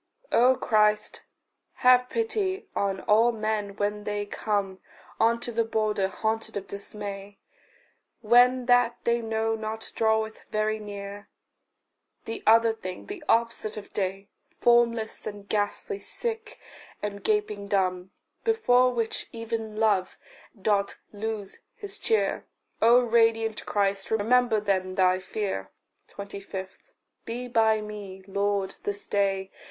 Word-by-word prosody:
O 255 +2 +5
Christ, 210 -2 +1 0.6
have 250 0 +6
pity 425 -4 -1
on 195 -1 0
all 225 +3 +4
men 215 -2 -2
when 205 0 -2
they 205 0 -2
come 200 -2 -2 0.4
Unto 235 +1 +2
the 230 0 +1
border 215 -3 0
haunted 220 +3 -2
of 195 - -5
dismay; 200 0 -7 0.8
When 245 +2 +5
that 245 -1 +4
they 235 0 +2
know 225 0 0
not 220 0 -5
draweth 220 0 0
very 215 0 0
near 205 -1 -8 1.0
The 225 - -5
other 230 0 +6
thing, 185 -5 -7
the 400 -5 -7
opposite 230 -2 +1
of 210 - -9
day, 195 0 -3 0.3
Formless 235 -2 +2
and 205 -1 -7
ghastly, 215 - -1
sick, 455 +1 -3 0.4
and 200 -1 -4
gaping 415 - 0
dumb, 185 -2 0 0.3
Before 255 - +4
which 230 -2 -2
even 225 -1 -4
love 205 -4 +2 0.4
doth 200 0 +1 0.2
lose 210 -1 -5 0.2
his 405 -1 -8
cheer: 445 -1 0 0.3
O 240 +2 +7
radiant 225 -1 +2
Christ, 200 -1 0
remember 225 +1 +3
then 190 -2 -1
thy 185 -1 +3
fear. 190 - -4 0.4
25. 200 -1 -7 0.4
Be 245 +2 -5
by 220 -2 +3
me, 205 -3 -8
Lord, 200 0 -1
this 205 0 -3
day. 195 -1 0
215 Hz, 120 wpm, -27 LUFS, 200-230 Hz, 1.0 s, O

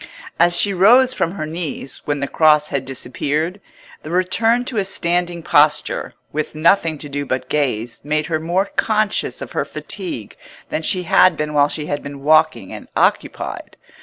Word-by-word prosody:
As 175 0 +5
she 200 +2 +3
rose 245 +8 +5
from 170 -8 -1
her 155 -6 -4
knees, 160 -3 -5
when 145 -1 -2
the 140 - -1
Cross 150 -1 +3
had 140 -2 -2
disappeared, 150 +8 -3 0.4
the 155 - -9
return 225 +7 +1
to 250 - -4
a 200 - +2
standing 175 -2 -1
posture, 150 0 +2 0.2
with 155 0 -3
nothing 165 0 +2
to 145 - -7
do 145 0 -3
but 130 -1 -3
gaze, 125 -6 -2
made 150 +1 -1
her 160 -1 -1
more 175 +5 0
conscious 215 0 -1
of - - -10
her - - -1
fatigue 340 -5 -7 0.3
than - - -2
she 180 +3 +1
had 185 +2 +4
been 150 0 -3
while 145 -1 +3
she 150 -1 -3
had 145 -1 -3
been 140 -1 -9
walking 155 - +2
and - - -9
occupied. - - -1
155 Hz, 175 wpm, -19 LUFS, 145-185 Hz, 0.4 s, As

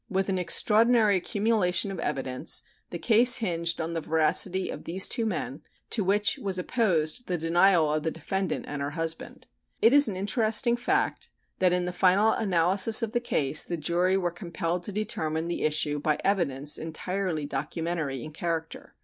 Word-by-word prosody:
With 195 -1 -1
an 190 -1 -1
extraordinary 220 +3 +3
accumulation 200 -1 0
of 190 - -7
evidence 135 -1 -2 0.3
the 170 - -6
case 235 +7 +5
hinged 170 -6 -1
on 165 +1 -4
the 165 - -3
veracity 160 +4 +1
of - - -9
these 185 +3 +3
two 230 -2 -1
men, 160 -6 -4 0.3
to 215 - +1
which 205 +2 +1
was 195 -2 -2
opposed 180 0 -1
the 180 - -1
denial 165 -1 +2
of 155 - -1
the 160 - -2
defendant 180 +2 -4
and 145 -1 -5
her 140 - -2
husband. 165 +1 -5 0.3
It 230 - +4
is 285 -1 +7
an 205 - -4
interesting 220 +4 +1
fact 240 - -1 0.3
that 185 -1 +3
in 180 0 0
the 180 - -4
final 190 +4 +3
analysis 195 +3 +4
of 225 - -3
the 240 - 0
case 155 - 0
the 170 - -5
jury 175 +4 0
were 175 -2 -2
compelled 170 0 -4
to - - -4
determine 165 -6 -3
the 175 - -3
issue 150 -1 0
by 150 0 0
evidence 150 -8 0
entirely 165 0 -4
documentary 150 -1 -4
in 155 - -9
character. 165 0 -5
180 Hz, 175 wpm, -26 LUFS, 160-205 Hz, 0.3 s, is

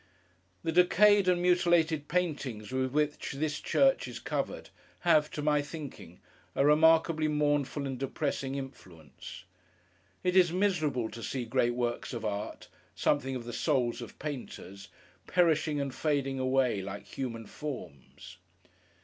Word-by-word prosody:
The 165 - 0
decayed 195 +3 +5
and 180 -1 +3
mutilated 170 -4 +3
paintings 145 -11 -2
with 130 0 -1
which 150 0 -1
this 150 +1 -2
church - - +2
is - - -7
covered, - - -4 0.3
have, 155 -3 +4
to 150 - -5
my 150 -1 +3
thinking, 145 -1 -9 0.4
a 140 - +3
remarkably 160 +1 +4
mournful 145 -1 0
and 135 -2 -4
depressing 135 0 -2
influence. 90 - -9 0.8
It 180 0 +1
is 180 -3 +6
miserable 160 - +1
to 115 - -8
see 125 +4 -3
great 120 0 +1
works 120 0 -2
of 115 -2 -4
art—something 130 +6 -3
of 125 - -5
the 120 - -6
Souls 125 -5 0
of 120 - -9
Painters—perishing 145 - -2
and 140 -2 -3
fading 140 -3 -1
away, 130 -5 +1
like 100 +1 -7
human 115 -4 -5
forms. 90 - -8
145 Hz, 130 wpm, -30 LUFS, 125-160 Hz, 0.8 s, is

